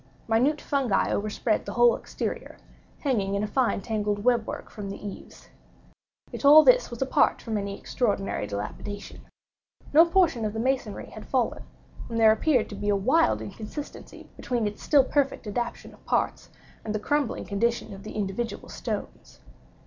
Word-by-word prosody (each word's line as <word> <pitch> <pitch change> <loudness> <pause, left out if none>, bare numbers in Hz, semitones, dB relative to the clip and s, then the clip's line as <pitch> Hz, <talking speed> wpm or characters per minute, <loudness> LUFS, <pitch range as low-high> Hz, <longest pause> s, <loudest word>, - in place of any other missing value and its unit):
Minute 255 +7 +2
fungi 265 -10 0
overspread 215 +1 0
the - - -4
whole 240 0 +5
exterior, - - -5 0.4
hanging 205 -9 0
in 200 - 0
a - - -1
fine 245 -2 +1
tangled 210 -1 -2
web 240 -3 +2
work - - -6
from 205 -2 -7
the 195 - -6
eaves. 205 -2 -10 0.8
Yet - - -7
all 300 +2 +9
this - - +5
was 240 +2 -2
apart 265 - +2
from 225 -2 -4
any 200 -1 -3
extraordinary 200 - -1
dilapidation. 105 - -6 0.7
No 325 +3 +8
portion 335 -9 +2
of 210 -1 -2
the 220 - -3
masonry 250 -4 -2
had - - -10
fallen; - - 0 0.5
and 230 -1 -2
there 220 -1 +7
appeared 245 +2 +2
to 205 - -7
be 205 +1 -3
a 205 - +3
wild 110 - +2
inconsistency 220 - -8
between 240 -4 -2
its 210 0 -4
still 285 -3 +5
perfect 275 -1 0
adaptation 235 +3 -4
of - - -20
parts, - - -1 0.3
and 215 -1 -3
the - - 0
crumbling 285 +3 -1
condition 225 +1 -1
of 195 - -10
the 215 - -8
individual 210 +3 -3
stones. - - -6
225 Hz, 165 wpm, -26 LUFS, 205-260 Hz, 0.8 s, all